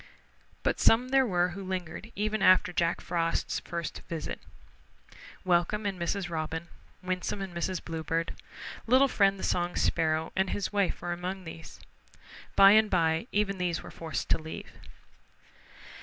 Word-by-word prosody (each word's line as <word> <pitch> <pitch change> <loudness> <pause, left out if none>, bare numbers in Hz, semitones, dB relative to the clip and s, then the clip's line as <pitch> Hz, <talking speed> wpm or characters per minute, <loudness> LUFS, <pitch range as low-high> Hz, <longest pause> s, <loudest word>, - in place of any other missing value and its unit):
But - - 0
some 245 +3 +4
there 265 -1 +4
were 180 -3 +2
who 195 +2 -7
lingered 185 +3 -5
even 215 0 -1
after 185 -1 +5
Jack 170 -1 +1
Frost's 165 -1 -1
first 170 -2 -5
visit. 165 -2 -4 1.1
Welcome 185 +4 +2
and 195 -3 -2
Mrs. 185 +2 -1
Robin, 165 0 -4 0.3
Winsome 185 +2 -2
and 195 -2 -5
Mrs. 175 +1 -2
Bluebird. 165 0 -2 0.5
Little 260 +4 +6
Friend 195 -6 +3
the - - -8
Song 175 0 0
Sparrow 160 0 +1
and 190 0 +1
his 205 0 -2
wife 200 -3 0
were 175 0 -1
among 185 +2 -5
these. 160 -2 -10 0.8
By 195 0 +9
and 215 0 +5
by 165 +2 +1
even 200 -2 0
they 175 -2 0
were - - -10
forced 165 -1 -4
to - - +3
leave. 160 0 -8
180 Hz, 150 wpm, -29 LUFS, 165-200 Hz, 1.1 s, By